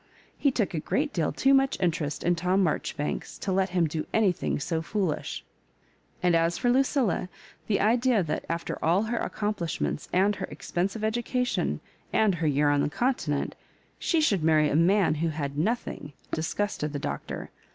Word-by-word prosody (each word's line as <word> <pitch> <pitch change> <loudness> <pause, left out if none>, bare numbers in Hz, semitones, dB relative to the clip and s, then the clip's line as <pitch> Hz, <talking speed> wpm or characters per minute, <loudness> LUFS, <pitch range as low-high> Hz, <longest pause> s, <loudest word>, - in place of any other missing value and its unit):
He 285 - +2
took 220 -7 -1
a 160 - -1
great 290 - -1
deal 165 -4 0
too 270 - +3
much 270 -4 +3
interest 160 -5 -1
in 175 - +3
Tom 180 +3 +2
Marjoribanks 150 -2 -2
to 195 - -3
let 190 0 +2
him 180 -2 +2
do 155 0 -3
anything 195 -9 +1
so 160 +3 -1
foolish; 180 -2 -2 0.8
and 175 -1 +4
as 165 +1 +2
for 245 -1 +2
Lu 255 - +4
cilla, 255 - +1 0.4
thQ 200 - +2
idea 235 0 +3
that, 155 -1 -2
after 170 0 -3
all 175 +6 +3
her 230 +1 -1
accomplishments^ 205 -7 -2
and 200 +3 +3
her - - -4
expensive 180 +8 -3
education, 240 +3 0 0.3
and 215 -3 +3
her 160 - +2
year 145 0 +3
on 145 0 +3
the - - +1
Continent, 160 - -1 0.5
she 335 - +1
should 200 - +2
marry 155 -2 +4
a - - +1
man 180 +3 +4
who 165 - +2
had 145 -3 -3
nothing, 155 -4 -2 0.2
disgusted 160 -1 -2
the - - -1
Doctor. 70 - -5
180 Hz, 170 wpm, -27 LUFS, 155-220 Hz, 0.8 s, and